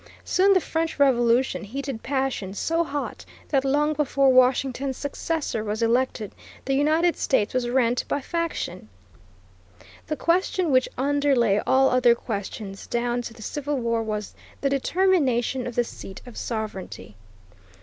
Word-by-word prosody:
Soon 390 +2 +4
the 375 - +4
French 325 -1 -2
Revolution 250 -3 +3
heated 260 +2 -5
passions 265 -8 -2
so 330 +1 +1
hot 290 -2 -5 0.3
that 270 -3 +2
long 295 +3 +2
before 275 -2 +2
Washington's 255 +1 +2
successor 285 -5 -3
was 215 +2 -2
elected 230 -2 0 0.3
the 270 - 0
United 315 +5 +3
States 210 -5 +1
was 250 -1 0
rent 245 -1 +2
by - - -1
faction. 295 - -4 1.2
The 305 - -2
question 355 -1 +1
which 255 -1 +3
underlay 270 -6 +2
all 265 0 +4
other 250 -2 +5
questions, 200 -3 -6
down 240 0 -1
to 235 -1 -7
the 220 - -11
Civil 290 +4 -3
War, 230 -2 0
was 210 -2 -4 0.3
the 275 - +1
determination 275 -6 +1
of 240 - -6
the 240 - +3
seat 195 -4 -9
of 245 -3 -11
sovereignty. 210 - -5
260 Hz, 140 wpm, -24 LUFS, 230-285 Hz, 1.2 s, other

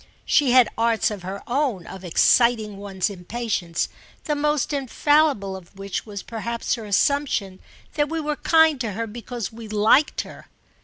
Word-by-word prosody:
She 290 -4 +3
had 255 -3 +7
arts 230 -1 +2
of 205 -3 -6
her 190 +2 -6
own 245 - -1
of 190 - -10
exciting 215 +4 +3
one's 195 -2 -2
impatience, 195 -3 -3 0.4
the 300 - -1
most 295 0 0
infallible 280 -6 +2
of 190 +1 -13
which 195 +2 -5
was 200 -2 -7
perhaps 235 +1 -3
her 230 -3 -4
assumption 205 -3 0 0.3
that 295 -1 0
we 325 0 -2
were 300 -1 -2
kind 320 -4 +4
to 225 -4 -2
her 230 +4 -3
because 235 0 -6
we 225 0 -9
liked 215 +8 +3
her. - - -12
230 Hz, 160 wpm, -23 LUFS, 200-280 Hz, 0.4 s, had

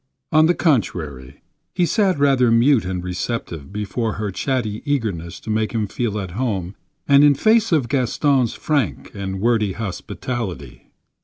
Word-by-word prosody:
On 155 0 +5
the 175 - +2
contrary, 75 - -1 0.3
he 175 - +3
sat 195 -1 +2
rather 135 -4 +3
mute 115 0 +4
and 90 -1 -3
receptive 90 - -4
before 105 +2 -2
her 105 -1 -3
chatty 110 -1 -2
eagerness 105 - -2
to 110 - -5
make 110 +1 0
him 110 -2 0
feel 105 +1 -2
at 95 -3 -5
home 100 -4 -2 0.3
and 140 0 +6
in 145 -1 +6
face 220 - +3
of 150 -7 +2
Gaston's 135 -1 +1
frank 145 - -1
and 95 -1 -4
wordy 110 -2 +1
hospitality. 95 - -5
115 Hz, 150 wpm, -21 LUFS, 95-140 Hz, 0.3 s, and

